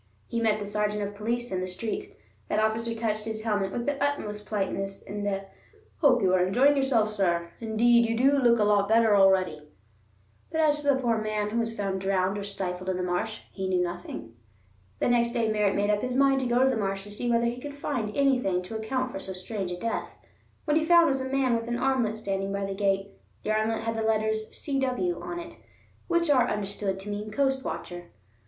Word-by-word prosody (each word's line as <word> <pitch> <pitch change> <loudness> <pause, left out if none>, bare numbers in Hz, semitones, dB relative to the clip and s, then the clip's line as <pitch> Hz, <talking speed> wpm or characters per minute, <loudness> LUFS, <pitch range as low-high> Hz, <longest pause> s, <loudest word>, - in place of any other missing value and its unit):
He 235 - -3
met 220 -2 +3
the 205 - -5
sergeant 210 0 -1
of 200 0 -4
police 235 +4 -3
in 185 -1 -1
the 185 - -2
street. 390 - -4 0.3
That - - 0
officer 220 +2 0
touched 215 -2 -2
his 220 -1 -4
helmet 205 -3 0
with 235 +3 -3
the 285 -1 -1
utmost 210 -8 -2
politeness 195 -1 -3
and 205 0 -4
a 195 -1 -2 0.5
"hope 255 - +4
you 185 -1 +3
are 180 -1 +4
enjoying 255 +10 +4
yourself, 250 -6 +2
sir; 170 -4 0
indeed 235 +1 +3
you 230 - 0
do 275 +3 +4
look 240 -2 +4
a 215 - +3
lot 205 -1 +3
better 225 -1 +5
already"; 185 -6 +3 0.8
but 320 - -1
as 300 -2 +4
to 290 - -6
the 280 - +5
poor 240 -4 +1
man 215 -1 -2
who 230 - 0
was 230 0 -2
found 195 -2 -2
drowned 190 0 +1
or - - -4
stifled 185 -2 -4
in 185 - 0
the 180 - -2
marsh, 180 +5 -2
he 190 -1 -4
knew 180 -1 +2
nothing. 175 -9 -6 0.6
The - - 0
next 235 -1 +2
day 230 -3 +1
Merritt 210 -2 +2
made 205 +1 +2
up 205 0 +1
his 250 0 -2
mind 275 0 +4
to 260 - -1
go 240 +2 +3
to 265 - +4
the 250 - -1
marsh 195 -2 -2
to 205 - -10
see 240 +4 -3
whether 235 0 +3
he 240 +1 -2
could 285 +1 -7
find 245 -7 -3
anything 250 -10 +2
to 200 +5 -7
account 255 +4 -2
for 195 - -5
so 190 - -6
strange 190 +1 -4
a 175 - -4
death. 230 +3 -3 0.5
What 300 -1 +2
he 315 - +2
found 340 0 +6
was 270 -1 0
a 260 - -4
man 265 -3 +2
with 230 0 -3
an 240 0 -1
armlet 250 -4 +1
standing 195 -2 -2
by 200 0 -2
the 195 - -3
gate. 195 0 0 0.3
The 215 - -1
armlet 220 +1 0
had 225 0 -2
the 225 - -2
letters 220 0 0
"C.W." 275 +5 -1
on 345 - -5
it, 335 0 -9 0.5
which 340 -1 +2
are 250 -3 +4
understood 200 -1 -2
to 205 - -8
mean 210 +1 -4
Coast 265 +3 0
Watcher. 175 0 -5
220 Hz, 225 wpm, -27 LUFS, 195-250 Hz, 0.8 s, found